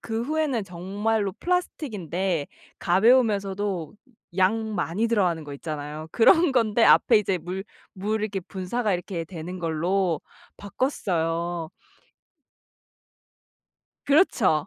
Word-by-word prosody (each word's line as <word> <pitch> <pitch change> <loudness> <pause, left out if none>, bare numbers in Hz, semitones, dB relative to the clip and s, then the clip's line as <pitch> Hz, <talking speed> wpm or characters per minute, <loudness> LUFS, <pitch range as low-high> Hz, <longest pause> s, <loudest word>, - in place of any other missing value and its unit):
그 225 0 -3
후에는 285 -5 -1
정말로 195 +3 -2
플라스틱인데 195 - -2 0.3
가벼우면서도 200 - +2 0.4
양 215 +3 +1
많이 190 +4 0
들어가는 180 -8 +1
거 145 - -8
있잖아요. 150 +1 -6
그런 325 +6 +5
건데 230 -2 +3
앞에 225 -3 +6
이제 195 -3 -1
물 180 +4 -5 0.3
물 210 +2 -2
이렇게 200 -3 -2
분사가 195 +4 -2
이렇게 175 -1 -4
되는 175 +2 -7
걸로 170 +1 0 0.4
바꿨어요. 175 - -2 2.4
그렇죠. 230 - +3
195 Hz, 250 characters per minute, -25 LUFS, 170-225 Hz, 2.4 s, 앞에